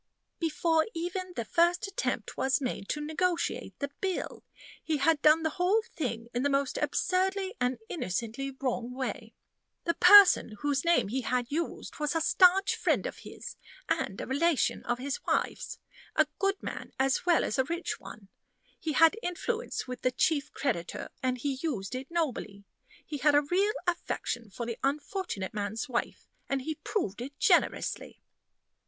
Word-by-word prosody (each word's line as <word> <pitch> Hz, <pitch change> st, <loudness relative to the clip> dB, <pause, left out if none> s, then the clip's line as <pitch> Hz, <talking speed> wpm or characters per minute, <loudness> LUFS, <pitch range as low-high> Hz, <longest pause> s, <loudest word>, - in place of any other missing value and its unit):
"Before 325 Hz, 0 st, +2 dB
even 360 Hz, +2 st, -3 dB
the 235 Hz, -, -3 dB
first 345 Hz, +6 st, +2 dB
attempt 395 Hz, +5 st, -3 dB
was 265 Hz, 0 st, +1 dB
made 250 Hz, -7 st, -4 dB
to 300 Hz, 0 st, -2 dB
negotiate 340 Hz, +3 st, -1 dB
the 280 Hz, -, -3 dB
bill. 380 Hz, -2 st, -3 dB, 0.4 s
He 315 Hz, -2 st, 0 dB
had 290 Hz, +1 st, +3 dB
done 310 Hz, +1 st, +5 dB
the 315 Hz, -, +1 dB
whole 410 Hz, +5 st, +3 dB
thing 235 Hz, -7 st, -3 dB
in 240 Hz, -, 0 dB
the 285 Hz, -, +2 dB
most 275 Hz, -1 st, 0 dB
absurdly 380 Hz, +1 st, 0 dB
and 250 Hz, 0 st, +1 dB
innocently 235 Hz, -, -3 dB
wrong 250 Hz, -2 st, -3 dB
way. 260 Hz, 0 st, -4 dB, 0.5 s
The 335 Hz, -, +1 dB
person 370 Hz, -, +8 dB
whose 285 Hz, -1 st, +1 dB
name 340 Hz, -, +3 dB
he 260 Hz, +4 st, -1 dB
had 250 Hz, +1 st, -1 dB
used 330 Hz, +1 st, -3 dB
was 300 Hz, +1 st, -1 dB
a -, -, +3 dB
stanch 370 Hz, +4 st, +5 dB
friend -, -, +1 dB
of -, -, -5 dB
his, -, -, -9 dB, 0.3 s
and -, -, -1 dB
a -, -, -3 dB
relation 300 Hz, +3 st, +1 dB
of 240 Hz, -, 0 dB
his 270 Hz, +2 st, -4 dB
wife's -, -, -1 dB, 0.4 s
a 310 Hz, -, +5 dB
good 390 Hz, 0 st, 0 dB
man -, -, -6 dB
as 265 Hz, 0 st, +2 dB
well 345 Hz, -2 st, +5 dB
as 215 Hz, -, -1 dB
a -, -, +5 dB
rich 340 Hz, +4 st, -3 dB
one. 205 Hz, -2 st, -11 dB, 0.5 s
He 315 Hz, -, -2 dB
had 325 Hz, -, +5 dB
influence 445 Hz, -, -3 dB
with 250 Hz, 0 st, -6 dB
the 255 Hz, -, +3 dB
chief 285 Hz, +3 st, +1 dB
creditor, 215 Hz, -12 st, -3 dB
and 255 Hz, 0 st, 0 dB
he 265 Hz, +1 st, -2 dB
used 225 Hz, -, -3 dB
it 255 Hz, +1 st, -5 dB
nobly. 255 Hz, -12 st, -2 dB, 0.4 s
He 295 Hz, -, -5 dB
had 290 Hz, +2 st, +4 dB
a 290 Hz, -, +5 dB
real 390 Hz, +8 st, +1 dB
affection 245 Hz, -9 st, -2 dB
for 200 Hz, +5 st, -5 dB
the 230 Hz, -1 st, -5 dB
unfortunate 285 Hz, -, -2 dB
man's 215 Hz, +3 st, -3 dB
wife, 240 Hz, -2 st, -3 dB, 0.2 s
and 275 Hz, -1 st, -1 dB
he 315 Hz, -, -2 dB
proved 235 Hz, -, -2 dB
it 275 Hz, +3 st, -7 dB
generously." -, -, +1 dB
290 Hz, 165 wpm, -29 LUFS, 255-345 Hz, 0.5 s, person